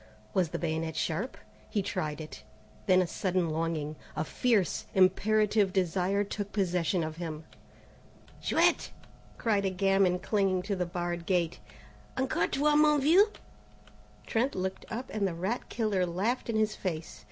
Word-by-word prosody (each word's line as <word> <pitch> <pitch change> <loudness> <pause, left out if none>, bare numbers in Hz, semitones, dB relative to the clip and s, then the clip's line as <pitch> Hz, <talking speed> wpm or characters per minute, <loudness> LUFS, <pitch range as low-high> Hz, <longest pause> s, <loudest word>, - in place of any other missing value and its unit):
Was 180 -4 +2
the - - -3
bayonet 160 -1 -2
sharp? 160 +10 -2 0.3
He 205 -3 0
tried 155 -6 -3
it. 155 -1 -8 0.5
Then 185 -1 +5
a - - -2
sudden 180 -1 -1
longing, 155 -2 -2 0.2
a 155 - 0
fierce, 205 +1 +1
imperative 205 +2 +3
desire 190 +2 +1
took 205 0 -5
possession 180 -3 +1
of 155 0 -5
him. 160 -2 -5 1.0
"Chouette!" - - +2 0.5
cried 210 -4 +1
a 195 - +1
gamin, 195 -1 +2
clinging 190 -1 +1
to 200 +1 -1
the 180 -2 -1
barred 175 -1 -3
gate, 175 -3 +1 0.6
"encore 265 0 +1
toi 295 +2 +2
mon 300 0 +5
vieux?" 350 +10 +5 1.0
Trent 245 +5 0
looked 190 0 -3
up, 245 +4 -5
and 205 -2 +1
the 175 - -4
rat 190 +8 -3
killer 215 -5 0
laughed 210 +9 -1
in 230 - 0
his 215 -1 +1
face. 160 - -4
190 Hz, 150 wpm, -30 LUFS, 170-215 Hz, 1.0 s, Then